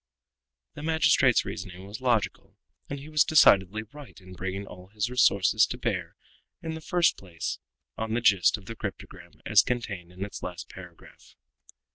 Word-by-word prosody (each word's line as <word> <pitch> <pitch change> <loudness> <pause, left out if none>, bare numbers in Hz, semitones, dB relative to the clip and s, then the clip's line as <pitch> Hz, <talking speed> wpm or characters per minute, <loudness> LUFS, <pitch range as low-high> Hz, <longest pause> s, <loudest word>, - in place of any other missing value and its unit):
The - - -9
magistrate's 150 -5 +3
reasoning 95 -1 -7
was 100 +5 -9
logical, 120 -4 -1 0.3
and 140 - -4
he 140 - -11
was 155 -1 +3
decidedly 105 - +4
right 140 +3 -13
in 95 -1 -13
bringing 95 +2 -5
all 90 -1 -12
his 105 +4 -3
resources 100 -8 +4
to - - -5
bear - - -3 0.5
in 160 -1 -4
the 160 - -7
first 175 +1 +2
place 85 -4 -5 0.4
on 110 0 -2
the 120 - 0
gist 100 -1 +4
of 100 - -15
the 115 - -7
cryptogram 105 -3 -8
as - - +6
contained 100 -8 -4
in 95 +2 -5
its 100 - -9
last 90 -2 -7
paragraph. - - -14
105 Hz, 165 wpm, -27 LUFS, 95-130 Hz, 0.5 s, as